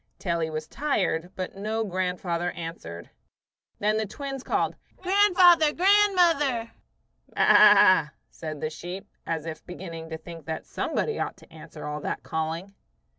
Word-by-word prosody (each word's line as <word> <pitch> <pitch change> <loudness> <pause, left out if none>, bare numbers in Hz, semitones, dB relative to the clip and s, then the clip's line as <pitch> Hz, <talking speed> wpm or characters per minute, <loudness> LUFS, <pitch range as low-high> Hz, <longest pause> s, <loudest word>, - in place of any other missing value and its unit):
till 175 -3 -2
he 160 -1 -1
was 155 0 -5
tired; 185 - -1
but 185 0 -5
no 215 +3 -2
grandfather 180 -2 -2
answered. 125 - -8 0.7
Then 215 +1 +1
the 220 -1 -1
twins 270 +4 -6
called, - - 0 0.2
"Grandfather! 365 -5 +5
Grandmother!" 350 - +3 0.6
"Baa," 195 -6 +6 0.2
said 155 -2 -7
the 155 - -2
sheep, 180 +5 -7 0.2
as 160 -2 -2
if 160 -1 -7
beginning 165 -3 -8
to 160 - -5
think 165 -2 -11
that 160 0 -4
somebody 450 - -2
ought - - -3
to - - -19
answer - - -10
all 150 0 -4
that - - -4
calling. 165 +5 -4
185 Hz, 140 wpm, -26 LUFS, 165-270 Hz, 0.7 s, Baa